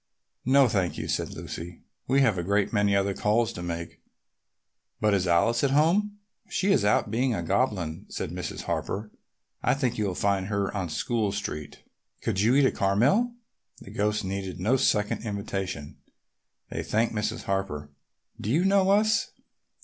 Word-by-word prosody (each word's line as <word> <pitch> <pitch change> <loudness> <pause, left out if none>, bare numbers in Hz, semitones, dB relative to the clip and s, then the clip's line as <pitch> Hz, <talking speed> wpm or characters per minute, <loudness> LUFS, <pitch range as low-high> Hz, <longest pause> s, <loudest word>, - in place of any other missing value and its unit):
"No, 135 +1 +5
thank 95 -6 0
you," - - -4
said - - -1
Lucy. 85 +1 -8 0.2
"We 135 +2 +3
have 120 -7 +4
a - - -2
great 100 +4 +1
many 105 -2 +3
other 100 0 +1
calls 110 +3 +1
to - - -7
make. 85 -1 -5 1.0
But 105 -1 +2
is 95 -2 +1
Alice 115 +9 +3
at 140 - +3
home?" 180 +9 +2 0.3
"She 195 +1 +1
is 150 - +3
out 105 0 +2
being 125 +1 +1
a 85 - -3
goblin," 90 -5 -1
said - - -4
Mrs. - - -5
Harper. 105 +2 -3 0.5
"I - - +2
think 125 -4 -1
you 105 - +1
will 90 - -3
find 100 -1 0
her 100 -1 -1
on 95 -4 -2
School 105 +6 -1
Street. 75 -7 -5 0.4
Could 95 - -1
you 115 +5 +4
each 140 - +5
eat - - +5
a - - -4
caramel?" 135 - +2 0.4
The - - -12
ghosts 105 +1 0
needed 95 -1 -4
no 110 +9 +2
second 105 -4 +1
invitation. 95 -7 -4 0.7
They - - -3
thanked 115 +2 0
Mrs. 105 -1 -2
Harper. 95 -7 -3 0.5
"Do 105 - -3
you 160 +10 +2
know 195 -1 +4
us?" 215 +2 +3
105 Hz, 170 wpm, -27 LUFS, 95-130 Hz, 1.0 s, No